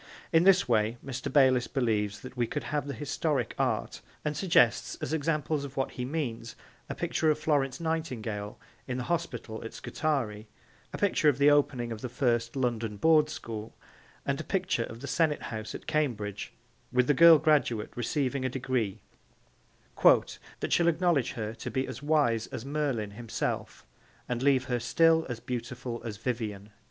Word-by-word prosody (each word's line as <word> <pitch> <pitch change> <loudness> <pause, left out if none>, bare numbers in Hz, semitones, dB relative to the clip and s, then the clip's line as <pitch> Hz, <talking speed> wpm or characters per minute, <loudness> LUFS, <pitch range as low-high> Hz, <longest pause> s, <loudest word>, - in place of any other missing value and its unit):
In 165 +2 +5
this 195 -1 +5
way 110 0 +2
Mr. 135 0 -4
Bayliss 130 -3 +4
believes 105 -5 -1
that 130 - -10
we 120 -2 0
could 145 - -4
have 150 -1 -2
the 140 - -4
historic 145 +3 -1
art, - - -1 0.2
and 150 0 -1
suggests 145 -8 +3
as 145 - -4
examples 155 -1 0
of 140 -1 -8
what 135 - 0
he 125 - -4
means 125 -6 -4 0.3
a - - -4
picture 160 - 0
of 150 - +3
Florence 145 -4 0
Nightingale 120 -11 -3 0.3
in 125 -1 -2
the 125 - -2
hospital 125 -9 -3
at 115 - -8
Scutari, 120 -9 -2 0.4
a - - -5
picture 185 -6 +3
of 140 - +1
the 140 +1 +6
opening 130 -5 +2
of 110 -1 -6
the 125 - -4
first 120 -2 0
London 115 -5 -1
Board 155 +2 +4
school, 110 -7 -7 0.5
and 140 +2 -1
a - - -7
picture 185 -11 0
of 115 +1 -10
the 140 - -6
Senate 160 -2 +1
House 110 -1 -5
at - - -9
Cambridge 110 -10 -2 0.4
with 125 0 +3
the 145 - +3
girl 165 +3 +9
graduate 145 -8 +1
receiving 130 +2 -1
a 130 - 0
degree 120 -6 -2 1.0
'that - - +2
shall 170 - +3
acknowledge 170 -6 +2
her 110 -1 -4
to 115 - -6
be 130 0 -1
as - - -7
wise 145 -7 +2
as 115 - -7
Merlin 135 -8 -1
himself 115 +2 -4 0.4
and 125 -1 -2
leave 135 -2 +3
her 125 -1 -1
still 160 +7 +3
as 120 -2 -4
beautiful 120 0 -5
as 110 -3 -5
Vivien.' 110 -3 -4
130 Hz, 170 wpm, -29 LUFS, 115-150 Hz, 1.0 s, girl